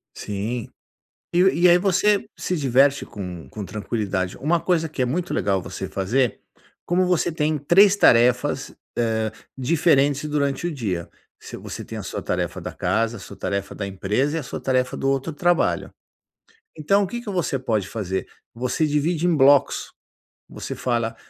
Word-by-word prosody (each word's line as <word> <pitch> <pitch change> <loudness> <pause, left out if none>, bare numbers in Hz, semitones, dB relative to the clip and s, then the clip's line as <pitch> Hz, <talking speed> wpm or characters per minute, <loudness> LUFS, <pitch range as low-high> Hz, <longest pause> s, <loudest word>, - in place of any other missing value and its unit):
Sim. 105 +4 -4 0.6
E 175 - +3 0.2
e 180 - +8
aí 175 - +7
você 195 +2 +2
se 180 - -2
diverte 135 0 +3
com 90 -8 -8
com 105 -2 -6
tranquilidade. 100 -2 -3
Uma 165 +5 +1
coisa 165 -2 0
que 145 - -4
é 125 - +3
muito 170 +8 -2
legal 95 -2 +1
você - - -6
fazer, 115 +5 0 0.5
como 180 +1 +2
você 175 -1 +1
tem 155 -1 0
3 185 +8 +5
tarefas, 125 -8 +3 0.2
hã, 110 -2 0 0.3
diferentes 145 0 +2
durante 145 +2 0
o - - -2
dia, 95 - -3 0.3
se - - -9
você - - -7
tem - - -7
a - - -5
sua - - -5
tarefa - - -2
da - - -6
casa, 115 0 0
a - - -11
sua - - -11
tarefa 100 -1 -3
da 100 - -4
empresa 105 +11 -1
e - - 0
a 150 - -5
sua 125 - -6
tarefa 130 -1 0
do 135 - -1
outro 135 +4 -1
trabalho. 175 +3 +1 0.9
Então, 200 +7 +2
o - - -2
que 240 +5 -5
que 235 - -7
você 170 -7 -1
pode 110 -6 -1
fazer? 95 -4 -3 0.3
Você 125 +7 0
divide 155 +3 0
em 175 - +3
blocos. 140 0 +4 0.6
Você - - -6
fala: 115 -2 -1
135 Hz, 170 wpm, -23 LUFS, 110-165 Hz, 0.9 s, e